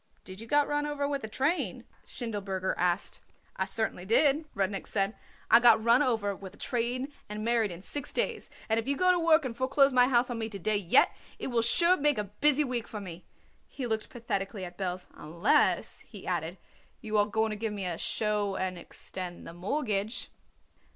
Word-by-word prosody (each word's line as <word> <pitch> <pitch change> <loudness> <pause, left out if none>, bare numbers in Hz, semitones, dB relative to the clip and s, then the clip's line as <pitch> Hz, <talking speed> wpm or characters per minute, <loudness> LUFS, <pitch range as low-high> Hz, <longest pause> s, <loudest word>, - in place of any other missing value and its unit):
"Did 190 +2 -9
you 225 - -9
got 290 +3 +3
run 295 0 0
over 290 -1 -1
with 280 -1 -2
a - - -3
train?" 275 - -1 0.2
Schindelberger 200 -6 -3
asked. 180 +1 -1 0.4
"I 190 - -1
certainly 200 -2 -2
did," 280 - +3
Rudnik 195 0 -1
said. 200 +1 -1 0.4
"I 230 - +9
got 240 -2 +6
run 235 +3 +5
over 220 -7 +1
with 190 -1 -10
a - - -21
train 250 +4 -2 0.2
and 210 +1 -5
married 230 -2 +2
in 175 +2 -9
six 290 +4 -3
days, - - -1 0.2
and 220 0 +2
if 225 - -5
you 280 0 +1
go 365 0 +4
to 360 - +2
work 325 -2 +4
and 240 -3 -4
foreclose 275 +2 +3
my 250 0 +5
house 245 -1 +2
on 235 - -3
me 220 0 -3
to 205 - -6
day 215 +3 0
yet, 195 -4 +4 0.3
it - - -4
will 240 -2 +2
sure 340 +10 +4
make 290 -2 +2
a 210 - 0
busy 285 +9 +2
week 245 -4 -2
for 215 - -6
me." 180 -3 -9 0.4
He 265 - -6
looked 220 -2 -2
pathetically 200 -4 -3
at 175 0 -9
Belz. 180 -1 -3
"Unless," 170 +6 +1
he - - -12
added, - - -2 0.4
"you 215 -3 -4
are 205 - +3
going 220 +1 0
to - - -2
give 220 +1 -3
me 200 -2 -4
a 175 -2 -3
show 210 -2 -1
and 185 -2 -2
extend 180 +1 -7
the - - -8
mortgage." 210 - -2
220 Hz, 205 wpm, -29 LUFS, 195-260 Hz, 0.4 s, I